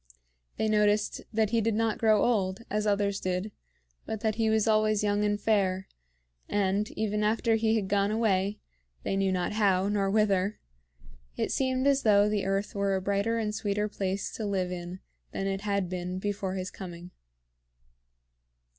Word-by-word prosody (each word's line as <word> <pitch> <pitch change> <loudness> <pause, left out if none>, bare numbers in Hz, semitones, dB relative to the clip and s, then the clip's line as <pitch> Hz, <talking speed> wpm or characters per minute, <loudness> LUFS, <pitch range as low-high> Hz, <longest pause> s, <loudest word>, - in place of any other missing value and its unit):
They 220 - 0
noticed 210 0 +2
that 220 -1 +1
he 230 -1 +2
did 225 0 0
not 225 0 0
grow 215 -2 +4
old, 195 -4 +1
as 210 +1 0
others 200 -1 +1
did, 185 +3 -2 0.6
but 220 -1 -4
that 220 -1 +1
he 225 0 +1
was 220 0 +2
always 215 -1 +3
young 205 0 +1
and 205 0 +1
fair; 190 -3 +1 0.6
and, 205 +1 +1
even 210 -1 0
after 225 +2 +2
he 220 0 +2
had 210 -4 -1
gone 200 0 +2
away, 210 -2 +1 0.5
they - - -1
knew 195 -1 +1
not 180 +1 -1
how, 200 -2 +2
nor 200 -1 +1
whither, 200 -1 +1 0.8
it - - -1
seemed 260 0 0
as 280 -1 +3
though 205 -1 +5
the 210 -2 0
earth 195 +1 -1
were 200 -1 0
a - - 0
brighter 200 +4 0
and 215 -2 -1
sweeter 210 -1 -1
place 195 -1 -3
to 225 - -6
live 190 -3 -1
in 180 +1 -6 0.3
than 195 - -2
it 195 0 -2
had 200 -2 0
been 180 0 -4
before 195 -1 -3
his 185 -1 -4
coming. 175 -1 -9
205 Hz, 175 wpm, -28 LUFS, 195-215 Hz, 0.8 s, though